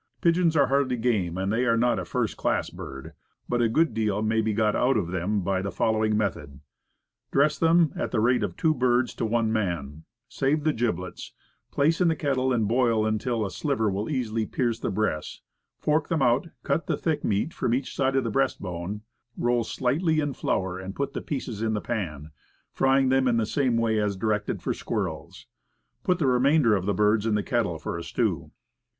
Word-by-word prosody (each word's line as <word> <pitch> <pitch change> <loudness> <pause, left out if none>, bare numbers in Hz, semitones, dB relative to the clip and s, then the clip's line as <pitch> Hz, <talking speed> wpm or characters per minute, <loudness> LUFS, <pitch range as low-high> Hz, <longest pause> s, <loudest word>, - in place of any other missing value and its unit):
Pigeons 170 -1 +2
are 140 - +5
hardly 135 -1 +1
game, 105 -8 0
and 95 +2 -1
they 120 +3 +1
are 115 -1 +3
not 120 -2 +2
a 90 - -4
first - - -2
class - - -1
bird; 65 0 -9 0.3
but 120 0 0
a 115 - +3
good 160 +8 +2
deal 105 -2 0
may 110 +1 +2
be 110 0 0
got 105 0 +1
out 125 0 +2
of 90 -5 -1
them 95 +3 -1
by 95 +1 0
the 100 - -3
fol 110 +4 +1
lowing 110 -1 +1
method: 75 -10 -3 0.7
Dress 145 +1 +2
them, 165 -1 +4
at - - -2
the 115 - 0
rate 125 +3 +3
of - - -3
two 160 -1 +2
birds 125 -2 +1
to - - -2
one 110 0 +1
man; 80 -8 -2 0.2
save 145 +3 0
the 155 0 +2
giblets; 95 -7 -3 0.4
place 160 +5 +1
in 180 - +4
the 165 - +2
kettle, 135 -4 0
and 115 -4 +1
boil 115 -2 +2
until 110 +1 -1
the 100 - -3
sliver 120 -8 0
will 100 +3 -3
easily 115 -6 -1
pierce 120 -3 -1
the - - -2
breast; 95 -6 -2 0.3
fork 150 0 +1
them 160 -5 0
out, 125 +6 +2 0.2
cut 165 - -1
the - - 0
thick 155 -3 -1
meat 105 +10 0
from 120 - -1
each 130 +2 -1
side 135 0 +1
of 135 - +2
the 115 - -2
breast - - +1
bone, 90 +2 -5 0.4
roll 120 0 +1
slightly 155 +8 0
in 145 -2 -1
flour, 95 -5 -2
and 95 +1 -7
put 140 - -3
the - - -4
pieces 125 -7 -4
in 110 -1 0
the - - 0
pan, 80 -11 -4 0.4
frying 135 0 +3
them 130 0 +3
in 120 -2 +2
the 115 - +1
same 125 0 +1
way 115 -1 +1
as 105 -1 0
directed 105 0 -1
for - - 0
squirrels. - - -4 0.6
Put 180 - +1
the 160 - 0
remainder 130 -1 +4
of 95 -1 -2
the 100 - +2
birds 105 +2 +2
in 110 - +2
the 105 - 0
kettle 115 - -1
for 85 - -5
a - - -6
stew. 85 -5 -1
115 Hz, 210 wpm, -26 LUFS, 105-135 Hz, 0.7 s, are